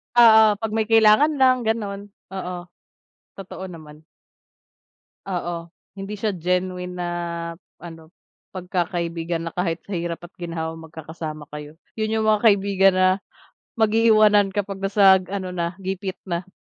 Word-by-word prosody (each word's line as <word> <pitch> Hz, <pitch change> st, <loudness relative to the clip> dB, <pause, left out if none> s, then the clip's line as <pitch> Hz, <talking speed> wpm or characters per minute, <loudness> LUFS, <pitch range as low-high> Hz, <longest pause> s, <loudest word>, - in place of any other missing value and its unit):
Oo, 220 Hz, -3 st, +7 dB
'pag 220 Hz, +1 st, -4 dB
may 220 Hz, 0 st, 0 dB
kailangan 225 Hz, +7 st, +5 dB
lang, 255 Hz, -3 st, +3 dB
gano'n. 205 Hz, -3 st, -2 dB, 0.3 s
Oo, 180 Hz, -2 st, -6 dB, 0.7 s
totoo 190 Hz, -1 st, -9 dB
naman. 155 Hz, -3 st, -12 dB, 1.2 s
Oo. 170 Hz, -3 st, -4 dB, 0.3 s
Hindi 195 Hz, +1 st, -6 dB
siya 210 Hz, +1 st, -2 dB
genuine 180 Hz, +1 st, -2 dB
na 175 Hz, -1 st, -4 dB, 0.7 s
ano, 165 Hz, -1 st, -12 dB, 0.4 s
pagkakaibigan 170 Hz, -2 st, -3 dB
na -, -, -17 dB
kahit 170 Hz, -2 st, -1 dB
sa 200 Hz, -, -9 dB
hirap 170 Hz, 0 st, -4 dB
at 175 Hz, +2 st, -12 dB
ginhawa 165 Hz, -2 st, -5 dB
magkakasama 160 Hz, -1 st, -8 dB
kayo. 150 Hz, 0 st, -9 dB, 0.2 s
Yun 215 Hz, 0 st, -1 dB
yung -, -, -1 dB
mga 215 Hz, +1 st, +2 dB
kaibigan 195 Hz, -2 st, +4 dB
na 185 Hz, 0 st, +4 dB, 0.7 s
mag-iiwanan, 215 Hz, -2 st, +4 dB
kapag 195 Hz, -1 st, -3 dB
nasa 195 Hz, -1 st, +5 dB
ano 185 Hz, 0 st, -5 dB
na, 170 Hz, -1 st, -3 dB
gipit 190 Hz, 0 st, -4 dB
na. 175 Hz, 0 st, -4 dB
185 Hz, 130 wpm, -22 LUFS, 170-210 Hz, 1.2 s, Oo